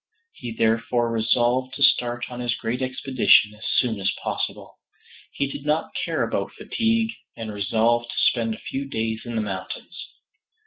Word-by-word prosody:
He 120 - -7
therefore 115 +1 +1
resolved 120 +3 +1
to 140 - 0
start 120 -2 +3
on 125 - -6
his 120 -1 0
great 120 +2 -3
expedition 130 -4 +4
as 105 +1 -8
soon 115 -5 +1
as 95 - +1
possible. - - -4 0.5
He - - 0
did 140 0 -6
not 150 +2 0
care - - -1
about - - -2
fatigue, 225 0 0 0.3
and 110 -2 -5
resolved 115 +4 +1
to - - -6
spend 115 -2 +2
a - - -13
few 135 +1 -2
days 110 -1 -2
in 120 - -4
the 110 - +1
mountains. 100 - -6
120 Hz, 165 wpm, -24 LUFS, 110-130 Hz, 0.5 s, expedition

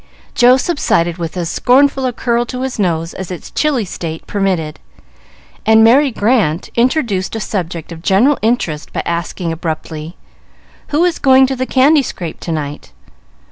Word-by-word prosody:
Joe 245 +1 +5
subsided 175 - 0
with 170 +1 -5
as 175 -2 -2
scornful 270 +1 +3
a - - -1
curl 235 0 0
to 250 +1 -4
his 265 -4 -4
nose 165 -3 -1
as 190 -2 -7
its 180 -3 -8
chilly 280 -8 0
state 165 -3 -6
permitted, 185 -7 -2 0.8
and 220 0 +5
Merry 270 +6 +5
Grant 210 -8 0
introduced 235 -6 0
a - - -2
subject 175 -6 -4
of 165 -1 -8
general 215 +11 +3
interest 210 -10 -1
by - - -2
asking 170 0 -3
abruptly, 160 0 -5 0.7
"Who 310 +4 +2
is 355 - 0
going 265 -1 +5
to 265 0 -2
the 255 0 -3
candy 285 +3 +4
scrape 175 -10 -6
to 170 - -5
night?" 150 -2 -5
205 Hz, 160 wpm, -16 LUFS, 170-260 Hz, 0.8 s, Joe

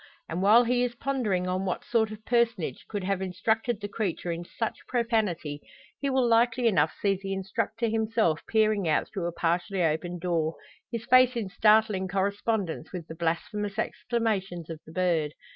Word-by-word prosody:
And 165 +3 -3
while 215 +5 +7
he 245 +1 +1
is 240 -1 -2
pondering 230 -9 -1
on 185 +1 -1
what 185 -2 -3
sort 225 -2 +2
of 215 0 -10
personage 230 - 0
could 205 -3 -3
have 195 0 -1
instructed 215 +5 0
the 205 - -4
creature 195 -4 -2
in 170 +1 -4
such 225 +6 -4
profanity, 210 - -1 0.4
he 280 - -1
will 260 -2 +2
likely 235 +1 +3
enough 160 -8 +3
see 195 -2 +1
the 195 0 -3
instructor 220 +4 -2
himself 220 -7 +1
peering 215 -4 +2
out 155 - +1
through 185 -5 -2
a - - -2
partially 175 +3 0
opened 170 +2 -1
door, 165 -3 0 0.4
his 230 -2 -4
face 255 0 +6
in 220 -5 -2
startling 210 -1 +3
correspondence 195 -3 -1
with 170 -3 -6
the 160 - -8
blasphemous 195 +5 -2
exclamations 195 -8 -2
of 160 - -7
the - - -10
bird. 165 -4 0
200 Hz, 175 wpm, -28 LUFS, 175-225 Hz, 0.4 s, while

